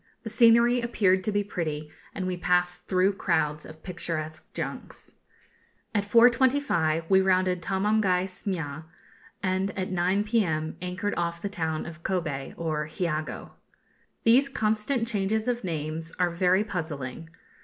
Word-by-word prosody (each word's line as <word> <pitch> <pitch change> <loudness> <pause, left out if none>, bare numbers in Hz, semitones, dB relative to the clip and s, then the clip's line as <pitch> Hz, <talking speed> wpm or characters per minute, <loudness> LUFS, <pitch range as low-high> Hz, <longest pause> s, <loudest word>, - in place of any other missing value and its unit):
The 225 - -5
scenery 235 +2 +5
appeared 195 -5 +2
to 215 - +1
be 205 0 +1
pretty, 155 -6 -4 0.2
and 190 - -3
we 185 0 -1
passed 180 0 +1
through 190 +1 +3
crowds 150 -5 0
of 155 0 -13
picturesque 155 -4 -4
junks. - - -7 0.8
At 205 -2 +1
4.25 235 - +3
we 190 +1 +5
rounded 185 -1 +2
Tomamgai 195 -1 +1
Smia, 165 -5 -4 0.6
and 190 +1 0
at 185 0 -2
9 185 +3 +1
p.m. 175 -9 0
anchored 180 +3 -2
off 170 0 -1
the 200 - -4
town 160 -5 -2
of 165 0 -9
Kobe, 160 -8 -3
or 155 -2 -2
Hiogo. 155 -1 -3 0.7
These 255 +5 +5
constant 220 +1 0
changes 215 0 0
of 245 -2 -1
names 160 -1 -3
are 180 -1 +2
very 180 +3 +3
puzzling. 160 - -5
185 Hz, 135 wpm, -27 LUFS, 165-210 Hz, 0.8 s, scenery